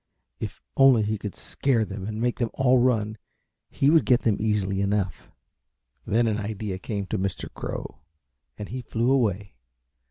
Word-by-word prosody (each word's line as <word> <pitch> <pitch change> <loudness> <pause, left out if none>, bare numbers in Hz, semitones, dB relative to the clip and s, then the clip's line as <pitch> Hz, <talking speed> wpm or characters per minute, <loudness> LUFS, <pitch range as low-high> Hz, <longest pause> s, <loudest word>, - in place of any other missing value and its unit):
If - - -6
only 135 -5 +6
he 105 0 -1
could 105 -1 -6
scare 120 -5 0
them 100 -1 -6
and 110 0 -4
make 120 +1 0
them 120 -2 0
all 130 -1 +4
run 110 -4 +1 0.5
he 140 +2 +2
would 165 -1 +5
get 125 -2 +3
them 110 -4 +2
easy 100 -3 0
enough. 100 -2 -1 0.8
Then 115 +3 +3
an 110 -1 0
idea 105 -2 -4
came 100 +1 -3
to 105 +1 -2
Mr. 95 0 -3
Crow - - -6 0.6
and 105 - -7
he 125 +2 -4
flew 120 +1 0
away. 105 -7 +1
110 Hz, 165 wpm, -25 LUFS, 100-120 Hz, 0.8 s, only